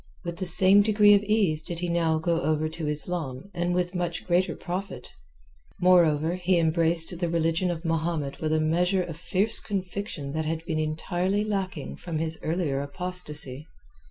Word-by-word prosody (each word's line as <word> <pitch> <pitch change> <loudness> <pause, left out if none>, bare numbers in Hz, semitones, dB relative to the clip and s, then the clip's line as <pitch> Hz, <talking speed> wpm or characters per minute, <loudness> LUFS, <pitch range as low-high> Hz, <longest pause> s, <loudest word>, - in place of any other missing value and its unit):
With 170 -1 -6
the 185 0 -2
same 190 +3 +6
degree 205 0 +5
of 200 - +4
ease 205 -7 +1
did 170 - -6
he 175 +1 -3
now 165 -2 +1
go 165 +1 -1
over 155 -1 0
to 160 0 -5
Islam 150 +1 -2
and 175 +1 -2
with 180 0 -1
much 175 -2 -4
greater 180 +1 +1
profit. 180 -7 -6 0.7
Moreover, 170 -3 +3
he 185 0 +1
embraced 165 +1 +4
the 175 -2 -1
Religion 165 +2 0
of 170 0 -5
Mahomet 160 -3 -2
with 155 -1 -1
a 155 - +2
measure 180 +4 +1
of 170 -3 -7
fierce 185 +5 +3
conviction 190 -7 -5
that 160 +1 -3
had 160 +1 -4
been 160 -3 -2
entirely 175 +6 -1
lacking 195 -3 -4
from 170 -3 -5
his 160 0 -3
earlier 155 -4 -2
apostasy. 150 -3 -2
170 Hz, 170 wpm, -26 LUFS, 155-185 Hz, 0.7 s, same